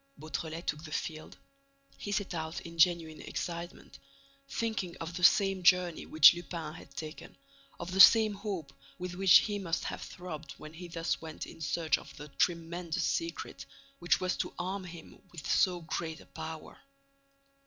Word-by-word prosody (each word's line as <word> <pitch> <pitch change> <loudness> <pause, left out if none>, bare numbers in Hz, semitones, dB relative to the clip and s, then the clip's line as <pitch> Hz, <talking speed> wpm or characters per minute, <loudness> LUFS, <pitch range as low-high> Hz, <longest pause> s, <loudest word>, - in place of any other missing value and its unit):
Beautrelet 160 +2 -5
took 150 +1 -2
the 155 - -9
field. 155 0 -5 0.6
He 205 - -6
set 205 -2 -1
out 160 0 -4
in 165 0 -10
genuine 165 -2 +3
excitement, 175 +1 -6 0.5
thinking 215 -6 -2
of 165 +1 -6
the 180 - -5
same 195 +2 +5
journey 180 -2 +3
which 155 -2 +8
Lupin 170 -3 -6
had 140 - -13
taken, 155 0 -8 0.4
of 170 +1 -5
the 190 - -2
same 215 +1 +9
hopes 195 -7 -5 0.2
with 180 0 -5
which 190 0 +7
he 205 -1 -2
must 170 -4 -2
have - - -4
throbbed 160 -5 -8
when 155 0 -11
he 175 +2 -8
thus 165 0 -2
went 160 -1 -6
in - - -12
search 160 +1 +1
of - - -14
the 150 +1 -9
tremendous 170 +1 -1
secret 335 0 -3 0.3
which 175 - +2
was 185 -1 0
to - - -3
arm 185 +2 -3
him 170 -2 -11
with 160 -5 -9
so 180 -2 +3
great 160 0 -4
a - - -15
power. 160 0 -8
170 Hz, 165 wpm, -31 LUFS, 160-185 Hz, 0.6 s, same